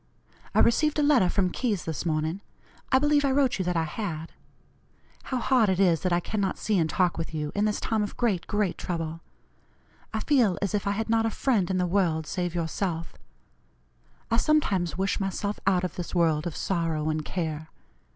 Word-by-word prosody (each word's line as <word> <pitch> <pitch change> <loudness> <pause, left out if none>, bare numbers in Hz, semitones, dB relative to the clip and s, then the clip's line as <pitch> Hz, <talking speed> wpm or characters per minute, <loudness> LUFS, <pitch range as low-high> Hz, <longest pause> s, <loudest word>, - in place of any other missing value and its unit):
I - - +6
received 300 +6 +3
a 300 - +2
letter 270 -11 +4
from 185 -2 +1
Keyes 215 -5 -1
this 160 +1 -3
morning. 160 +4 -1 0.5
I 260 - +6
believe 295 +1 +3
I 280 - +2
wrote 265 -5 +2
you 185 - -1
that 180 -1 0
I 165 - +2
had. 160 -1 -5 0.9
How 260 - -2
hard 245 -3 +3
it 190 -1 +1
is 175 -4 +3
that 185 - 0
I 175 - +3
cannot 195 +1 -2
see 210 -3 0
and 160 -1 +1
talk 180 -1 +1
with 165 0 -4
you 150 -1 -2
in 205 +1 +1
this 210 -1 0
time 220 -1 0
of 205 - -4
great, 210 -8 0
great 205 -4 -1
trouble. 165 -2 -4 0.9
I 220 - -2
feel 240 -10 +3
as 200 0 -2
if 205 -1 -1
I - - +2
had 220 +2 -2
not 225 0 +3
a - - +1
friend 220 -5 +1
in 190 - 0
the 180 - +1
world 170 -4 +1
save 175 +1 -3
yourself. 165 0 -2 1.2
I 230 - +3
sometimes 205 - +1
wish 195 0 0
myself 200 +1 -2
out 185 -2 +3
of 180 - -3
this 180 0 -5
world 165 -2 +2
of 170 - -5
sorrow 165 -4 -1
and 155 0 -2
care. 160 -2 -4
185 Hz, 200 wpm, -27 LUFS, 165-220 Hz, 1.2 s, I